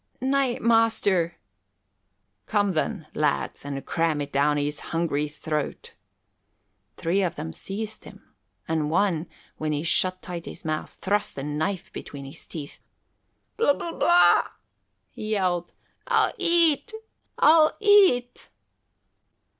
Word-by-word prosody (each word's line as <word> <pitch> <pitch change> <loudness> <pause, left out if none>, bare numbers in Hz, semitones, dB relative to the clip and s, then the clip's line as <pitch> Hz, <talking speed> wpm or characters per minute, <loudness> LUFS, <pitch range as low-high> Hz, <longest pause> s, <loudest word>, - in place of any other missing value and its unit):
"Nay, 265 -1 +1
master 220 -7 +2 0.5
" 100 0 -50
"Come, 205 -2 +1
then, 170 +1 -2
lads, 150 -2 -1
and 140 -1 -5
cram 165 -3 0
it 145 0 -4
down 145 +2 +2
his 145 +1 -2
hungry 155 -3 -1
throat." 150 0 -4 1.0
Three 180 +4 0
of 175 -3 -1
them 80 - -6
seized 215 - -6
him, 200 - -15 0.3
and 160 -2 0
one, 180 -1 +1 0.3
when 155 -1 -2
he 150 +1 -2
shut 185 +3 +2
tight 175 -5 -7
his - - -8
mouth, 155 0 -4
thrust 205 -3 0
a 135 - -4
knife 155 +6 -3
between 140 -1 -8
his 135 - -11
teeth. 150 -3 -8 0.8
"Blub 285 -11 +3
bub 335 - -6
blah!" 350 0 +5 0.6
he 215 - -7
yelled. 180 -4 0 0.4
"I'll - - +2
eat! 335 -2 +3 0.5
I'll 310 0 +5
eat!" 390 - +4
170 Hz, 125 wpm, -25 LUFS, 150-220 Hz, 1.0 s, blah